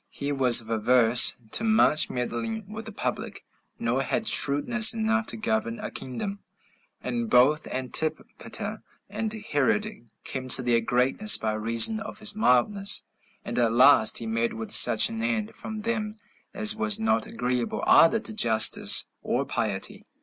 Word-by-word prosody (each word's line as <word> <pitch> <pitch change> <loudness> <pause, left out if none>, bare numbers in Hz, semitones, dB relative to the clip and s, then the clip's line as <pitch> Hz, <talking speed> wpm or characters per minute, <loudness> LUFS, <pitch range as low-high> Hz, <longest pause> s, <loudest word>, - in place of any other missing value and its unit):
He 140 +1 -7
was 130 -4 +4
averse 115 +2 +3
to - - +1
much 220 -8 +2
meddling 125 - -6
with 215 +2 -10
the - - -9
public, - - -7 0.3
nor 120 +3 -3
had 220 - -4
shrewdness 220 +11 +5
enough 225 0 -2
to - - -4
govern 220 +1 -4
a 210 -1 -8
kingdom. 195 - -7 0.6
And 235 -2 -5
both 145 +3 +1
Antipater 130 +5 -4 0.3
and 220 -1 -5
Herod 210 - -4 0.2
came 130 -1 -7
to 130 0 +5
their 120 -1 0
greatness 125 - +2
by 110 -1 -4
reason 115 - +2
of 220 -1 -10
his 215 -1 -1
mildness; 200 - +1 0.4
and - - -5
at 115 -2 0
last 120 -3 +3
he 115 - -2
met 115 +1 -4
with 110 0 -8
such 110 - +7
an 225 0 -7
end 225 -2 -4
from 220 -1 -9
them 215 -1 -5 0.3
as 215 +2 +3
was 215 -1 0
not 220 0 -1
agreeable 125 - -5
either 165 +8 +3
to 220 - -5
justice 110 - +3 0.2
or - - -4
piety. - - -4
190 Hz, 150 wpm, -23 LUFS, -, 0.6 s, such